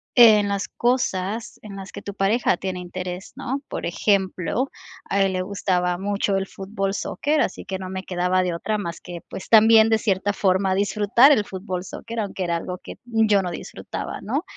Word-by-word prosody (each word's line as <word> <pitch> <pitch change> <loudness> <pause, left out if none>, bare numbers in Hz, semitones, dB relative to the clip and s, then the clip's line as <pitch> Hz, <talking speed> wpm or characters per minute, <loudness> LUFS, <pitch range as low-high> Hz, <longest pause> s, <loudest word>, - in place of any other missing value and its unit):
en 215 -4 +7
las 200 -1 -1
cosas 225 -3 -1
en 205 -2 -9
las 195 0 -8
que - - -7
tu 200 - -6
pareja 200 0 +2
tiene 185 -1 -4
interés, 180 +1 -6
¿no?, 270 +3 -3
por - - -4
ejemplo, 195 +6 0 0.4
a 200 - +2
él 195 -1 +2
le 185 - -1
gustaba 180 -2 0
mucho 200 +1 0
el 195 - -2
fútbol 195 0 -3
soccer, 295 +8 -1
así 220 - -2
que 190 - -4
no 185 -1 -7
me 190 0 -5
quedaba 180 0 +1
de 180 -2 -1
otra 215 +6 -2
más 170 -4 -5
que, 175 -1 -8
pues, 190 - -7
también 220 0 +7
de 220 - +4
cierta 200 -1 0
forma 190 -1 +2
disfrutar 205 +7 +4
el 210 -7 +3
fútbol 185 -2 -5
soccer, 230 +3 -6
aunque 195 -3 -3
era 170 -1 0
algo 180 +2 -6
que - - -9
yo 220 -4 +3
no 180 - -3
disfrutaba, - - -6
¿no?, 275 - -2
195 Hz, 195 wpm, -23 LUFS, 185-215 Hz, 0.4 s, en